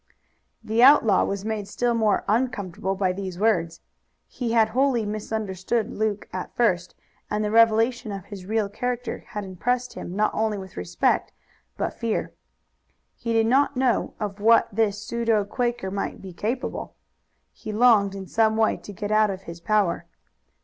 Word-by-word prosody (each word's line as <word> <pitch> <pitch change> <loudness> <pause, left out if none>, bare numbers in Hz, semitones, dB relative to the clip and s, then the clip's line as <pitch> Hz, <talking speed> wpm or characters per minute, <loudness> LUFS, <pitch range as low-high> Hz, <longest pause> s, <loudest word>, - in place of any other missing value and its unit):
The 220 +2 +1
outlaw 245 -7 +6
was 200 0 -3
made 215 -2 -3
still 240 +4 0
more 220 -3 +2
uncomfortable 200 -5 -1
by 190 -1 +1
these 185 -2 -5
words. 175 -6 +1 0.5
He 235 -3 -3
had 220 -2 +4
wholly 250 -1 +1
misunderstood 215 0 -2
Luke 210 -1 -2
at 185 - -5
first, 185 -7 +1 0.3
and 210 0 -1
the 210 - -1
revelation 230 +1 +3
of 195 -2 -6
his 195 -3 -9
real 220 -1 +1
character 245 +4 -3
had 210 - -5
impressed 245 +7 -2
him 175 - -7
not 215 +1 +1
only 220 -1 0
with 190 -1 -9
respect 90 0 0 0.5
but - - -2
fear. 230 -2 -2 0.8
He 230 - -4
did 225 -1 +3
not 270 +3 +2
know 255 -2 +1
of 205 -1 -4
what 230 +3 +5
this 205 -1 +1
pseudo 225 -2 0
Quaker 240 -2 -2
might 200 0 -3
be 190 -2 -9
capable. 230 +8 -4 0.6
He 215 - -7
longed 210 -3 +4
in 195 -1 -6
some 220 +2 +2
way 220 -1 +2
to - - -10
get 205 +1 -5
out 215 0 +4
of 190 -1 -5
his 170 -1 -9
power. 205 -3 +1
215 Hz, 165 wpm, -24 LUFS, 195-230 Hz, 0.8 s, outlaw